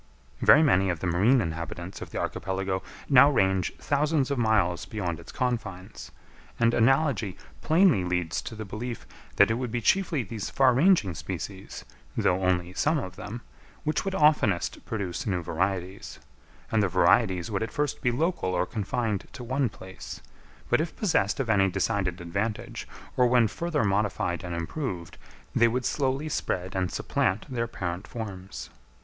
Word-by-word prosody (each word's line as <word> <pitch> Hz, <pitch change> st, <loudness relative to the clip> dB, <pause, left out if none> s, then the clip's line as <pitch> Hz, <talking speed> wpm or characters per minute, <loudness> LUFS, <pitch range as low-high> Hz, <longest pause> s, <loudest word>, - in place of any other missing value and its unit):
Very 155 Hz, -, +7 dB
many 95 Hz, -10 st, +3 dB
of 85 Hz, -3 st, -1 dB
the -, -, -4 dB
marine 100 Hz, +9 st, +4 dB
inhabitants 85 Hz, +1 st, -5 dB
of -, -, -6 dB
the -, -, -6 dB
archipelago 95 Hz, 0 st, -2 dB, 0.3 s
now 140 Hz, 0 st, +7 dB
range 95 Hz, -8 st, +1 dB
thousands 145 Hz, -1 st, 0 dB
of 140 Hz, -, 0 dB
miles 105 Hz, -7 st, +2 dB
beyond 90 Hz, -7 st, -3 dB
its 85 Hz, -, -11 dB
confines; 110 Hz, -5 st, -4 dB, 0.5 s
and 115 Hz, 0 st, +4 dB
analogy 120 Hz, -, +2 dB, 0.2 s
plainly 160 Hz, -, +4 dB
leads 90 Hz, -2 st, -1 dB
to 110 Hz, -, -7 dB
the 110 Hz, 0 st, -6 dB
belief 115 Hz, +4 st, -6 dB, 0.3 s
that 100 Hz, +2 st, +5 dB
it 115 Hz, -, -1 dB
would 125 Hz, -3 st, -3 dB
be 120 Hz, -, -1 dB
chiefly 165 Hz, -, +2 dB
these 105 Hz, 0 st, -5 dB
far 130 Hz, -2 st, +4 dB
ranging 140 Hz, -, +4 dB
species, 95 Hz, +3 st, -6 dB, 0.3 s
though 90 Hz, +1 st, +2 dB
only 90 Hz, -1 st, +1 dB
some 155 Hz, -, +1 dB
of 95 Hz, -10 st, -5 dB
them, 120 Hz, +6 st, -7 dB, 0.4 s
which 155 Hz, 0 st, 0 dB
would 195 Hz, -1 st, -2 dB
oftenest 150 Hz, -, +2 dB
produce 100 Hz, -5 st, -3 dB
new 90 Hz, -4 st, -1 dB
varieties; 95 Hz, +3 st, -3 dB, 0.5 s
and 110 Hz, -, +3 dB
the 100 Hz, -, +3 dB
varieties 90 Hz, +2 st, +3 dB
would 100 Hz, -, -1 dB
at 110 Hz, -, -2 dB
first 145 Hz, -1 st, -2 dB
be 125 Hz, -, +2 dB
local 125 Hz, -, 0 dB
or -, -, +1 dB
confined 110 Hz, -1 st, -2 dB
to 135 Hz, -3 st, -8 dB
one 130 Hz, +1 st, 0 dB
place, 95 Hz, -2 st, -9 dB, 0.5 s
but -, -, +3 dB
if 160 Hz, -, -4 dB
possessed 140 Hz, -, +1 dB
of 135 Hz, -, -1 dB
any 100 Hz, -3 st, +3 dB
decided 95 Hz, -1 st, -1 dB
advantage, 100 Hz, +6 st, -3 dB, 0.3 s
or 125 Hz, -, +4 dB
when 120 Hz, -2 st, +4 dB
further 160 Hz, +6 st, -1 dB
modified 100 Hz, -4 st, 0 dB
and 90 Hz, -1 st, -4 dB
improved, 85 Hz, -, -4 dB, 0.3 s
they 120 Hz, -, +5 dB
would 125 Hz, +2 st, -1 dB
slowly 135 Hz, +1 st, 0 dB
spread 95 Hz, -11 st, -2 dB
and 95 Hz, -1 st, 0 dB
supplant 100 Hz, +3 st, 0 dB
their 115 Hz, -1 st, -1 dB
parent 90 Hz, -4 st, -5 dB
forms. 95 Hz, -, -7 dB
105 Hz, 165 wpm, -27 LUFS, 95-125 Hz, 0.5 s, Very